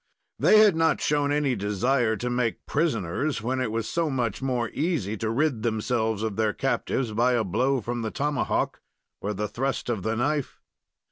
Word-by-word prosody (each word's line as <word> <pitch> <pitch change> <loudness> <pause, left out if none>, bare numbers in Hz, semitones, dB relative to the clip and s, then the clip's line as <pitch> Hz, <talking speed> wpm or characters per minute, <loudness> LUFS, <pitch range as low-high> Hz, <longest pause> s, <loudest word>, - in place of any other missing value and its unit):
They 215 - +6
had 210 -4 +6
not 165 0 +2
shown 145 -1 +1
any 145 -3 +1
desire 110 +4 +1
to 120 +4 -4
make 120 -2 -1
prisoners, 140 - -1
when 130 +2 -1
it 120 -4 -1
was 115 0 -2
so 165 -2 0
much 120 -5 -1
more 125 -3 -1
easy 145 - -1
to 110 +2 -2
rid 130 0 +1
themselves 110 -1 0
of 110 -2 -2
their 110 -1 +1
captives 135 -2 -1
by 120 +4 +2
a 120 -2 +2
blow 125 +7 +1
from 120 +2 -3
the 110 - -2
tomahawk 145 +3 -1 0.4
or 105 +1 -2
the 105 +2 -2
thrust 130 +5 -2
of 110 -5 -2
the 110 +4 -1
knife. 145 +3 -1
120 Hz, 185 wpm, -26 LUFS, 110-140 Hz, 0.4 s, They